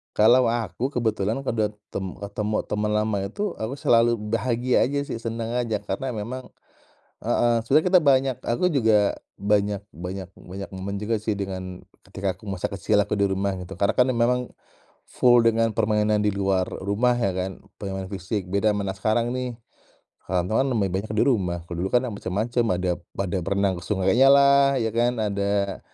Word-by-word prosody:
Kalau 120 +4 +5
aku 115 +3 -2
kebetulan 110 +1 0
kudat 110 -5 -1 0.2
tem 95 -2 -4
ketemu 105 +1 -2
teman 105 0 0
lama 105 -1 +1
itu 200 - -3
aku 110 +4 -3
selalu 120 -3 +3
bahagia 115 +3 +1
aja 140 +2 -1
sih 140 - -5
senang 115 0 -4
aja 110 -4 -1
karena 115 +6 -3
memang 125 +4 -5 0.8
heeh. 120 -1 +2
Sebenarnya 150 +8 +3
kita 180 0 +6
banyak 135 -2 +3
aku 120 +10 +1
juga 110 - +3 0.2
banyak 100 0 +1
banyak 90 +1 -7
banyak 95 +2 -8
momen 100 +1 -5
juga 110 +2 0
sih 110 +1 -2
dengan 95 -2 -5 0.2
ketika 95 -1 -3
aku - - -18
masa 95 -3 -3
kecil 105 +1 +1
aku 105 +1 -1
di 100 - +2
rumah 95 0 0
gitu. 90 0 -8
Karena 100 +1 0
kan 125 - +6
memang 125 +1 0 0.6
full 120 -1 +5
dengan 115 -1 +2
permainan 105 -1 +1
di 105 - +2
luar 95 -2 0
rumah 110 +6 0
ya 105 -6 0
kan, 95 +1 -5 0.2
permainan 95 -1 -5
fisik. 95 +1 -3
Beda 100 +2 +2
sama 105 -1 -2
anak 95 -1 -5
sekarang 115 +3 +1
nih, 125 -2 -3 0.7
kawan-kawan 95 +9 +1
lebih 100 -3 +1
banyak 110 +1 -7
di - - +4
rumah. 95 -10 +1
Kalau 85 - -5
dulu - - 0
kan 125 +1 +4
macem-macem, 110 +5 -1
ada 90 0 0 0.3
pada 95 -1 -1
berenang 100 0 +1
ke - - -14
sungainyalah 140 +7 +5
ya 110 - 0
kan. 120 +1 +2
Ada 100 -2 -1
105 Hz, 170 wpm, -24 LUFS, 100-120 Hz, 0.8 s, kita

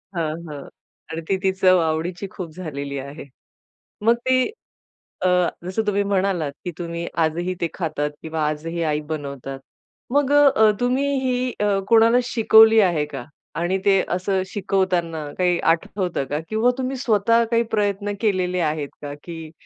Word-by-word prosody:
हां, 160 -2 -1 0.2
हां, 145 -1 -7 0.5
आणि 165 +1 -4
ती 190 - +1
ती 190 - +3
चव 185 -1 +4
आवडीची 165 +4 -2
खूप 170 -4 -7
झालेली 140 -5 -5
आहे. 140 +3 -8 0.8
मग 230 +2 +5
ती 255 0 +3 0.8
अ, - - +5 0.4
जसं 190 +5 -1
तुम्ही 205 0 +2
म्हणालात 190 -6 0
की 175 - -2
तुम्ही 170 -1 -4 0.2
आजही 175 +3 -2
ते 170 - +1
खातात 155 -4 -2
किंवा 160 0 -4
आजही 165 +3 -3
आई 150 -2 0
बनवतात, 140 -3 -5 0.5
मग 285 -1 +2
अ, 270 -7 +6
तुम्ही 250 +3 +1
ही 255 -1 -1
अ, 205 -1 +2
कोणाला 230 +1 +6
शिकवली 225 -2 +6
आहे 170 -7 +2
का? 130 -3 -5 0.4
आणि 180 +3 0
ते 195 -1 +5 0.2
असं 190 +1 0
शिकवताना 185 -5 -1
काही 180 -1 +2 0.2
आठवतं 175 -3 -3
का? 145 - -1
किंवा 220 +3 +2
तुम्ही 260 +1 -2
स्वतः 230 0 +3
काही 230 0 +3
प्रयत्न 205 -1 0
केलेले 185 -4 +1
आहेत 150 -3 -1
का 145 -1 -6
की 165 -2 -8
185 Hz, 155 wpm, -22 LUFS, 160-215 Hz, 0.8 s, अ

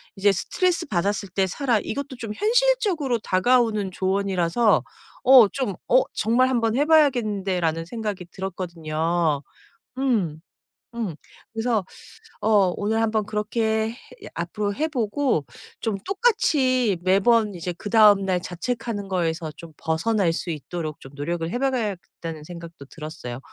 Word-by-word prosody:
이제 200 +1 +4
스트레스받았을 205 - -1
때 190 +1 +1
사라 245 +4 +1
이것도 280 -1 -4
좀 225 -4 -5
현실적으로 420 - +2
다가오는 215 0 +2
조언이라서 190 +2 +1 0.4
어 255 -4 +9
좀 250 -7 -3
'어 - - +5
정말 250 +4 +3
한번 230 -3 +1
해 290 - +3
봐야겠는데.'라는 200 - +2
생각이 210 -2 -4
들었거든요. 170 -4 -2 0.5
음 215 - 0 0.5
음 215 -9 -3 0.4
그래서 225 -3 0 0.6
어 205 -4 +3
오늘 220 +2 0
한번 220 -2 +1
그렇게 220 +1 -1 0.4
앞으로 200 +5 -2
해보고 255 - 0 0.3
좀 220 -4 -1
똑같이 265 - +2
매번 205 +2 +3
이제 180 +1 -4
그다음 210 -2 +5
날 180 -2 0
자책하는 205 +3 -4
거에서 165 -4 -2
좀 165 -1 -11
벗어날 170 +3 +1
수 170 - -4
있도록 155 0 -5
좀 135 - -13
노력을 165 +3 -3
해 245 - -2
봐야겠다는 200 - -3
생각도 170 -2 -10
들었어요. 150 -5 -7
205 Hz, 295 characters per minute, -24 LUFS, 175-240 Hz, 0.6 s, 어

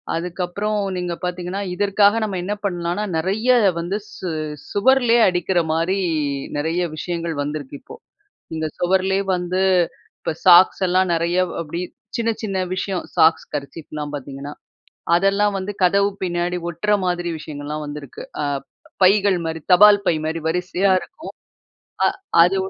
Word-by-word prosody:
அதுக்கப்புறம் 180 +5 -2 0.2
நீங்க 180 -1 -2
பார்த்தீங்கன்னா, 180 +2 -3
இதற்காக 205 +1 +3
நம்ம 200 -3 -2
என்ன 200 +3 -2
பண்ணலானா 175 +1 -2
நெறைய 200 +9 -1 0.3
வந்து 175 +4 -2 0.2
சு 185 - -5 0.4
சுவர்லேயே 240 +2 +4
அடிக்கிற 180 0 0
மாரி 170 +4 0 0.6
நெறைய 165 +4 0
விஷயங்கள் 170 0 -3
வந்திருக்கு 145 -1 -5
இப்போ. - - -12 0.6
இந்த 160 0 -1
சுவருலேயே 190 +2 +1
வந்து, 180 +1 -1 0.6
இப்ப - - -3
சாக்ஸ் 180 +2 +7
எல்லாம் 185 0 +2
நெறைய 170 +2 0 0.2
அப்டி 170 +2 -5 0.3
சின்ன 230 -1 0
சின்ன 200 -3 -3 0.2
விஷயம் 185 -1 -3
சாக்ஸ் 160 +1 +4
கர்ச்சீஃப்லாம் 150 +1 -6
பார்த்தீங்கன்னா. 140 0 -7 0.6
அதெல்லாம் 200 +2 +2
வந்து 190 +2 -4
கதவு 200 +2 +3
பின்னாடி 175 0 -1
ஒட்டுற 190 +6 -1
மாதிரி 175 -1 -1
விஷயங்கள்லாம் 150 0 -6
வந்திருக்கு. 145 -2 -8 0.2
அ - - 0 0.6
பைகள் 195 0 +4
மாரி, 160 0 -4
தபால் 205 +2 +7
பை 165 - +3
மாரி 160 +1 -2
வரிசையா 180 +3 +1
இருக்கும். - - -11 0.7
அ - - +5 0.4
அது 185 +3 +1
180 Hz, 130 wpm, -21 LUFS, 165-195 Hz, 0.7 s, சாக்ஸ்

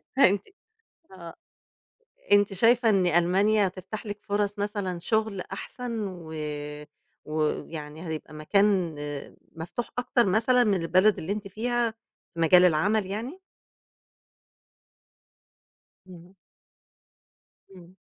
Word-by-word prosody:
فأنتِ 205 -7 +5 0.7
آه، 170 -3 -10 1.0
أنتِ 205 0 +5
شايفة 230 +4 +4
إن 195 -4 +3
ألمانيا 190 +5 +3
هتفتح 190 +4 -7
لِك 205 0 -6
فرص 205 0 -1
مثلًا 200 -3 -3
شغل 215 0 -1
أحسن 225 +3 -5
و 170 -4 -9 0.9
ويعني 155 +1 -3
هيبقى 155 -1 -6
مكان 185 +2 +1 0.6
مفتوح 170 +9 -5
أكتر 245 -1 +2
مثلًا 230 +6 +3
من 200 -6 +1
البلد 185 +5 +3
اللي 165 - -4
أنتِ 205 0 -4
فيها 235 +3 -1 0.4
في 170 - -9
مجال 180 +2 +6
العمل 190 +6 +2
يعني؟ 230 - -5 2.7
إمم. 180 0 -14 1.4
إمم. 180 0 -15
195 Hz, 100 wpm, -26 LUFS, 175-215 Hz, 2.7 s, مجال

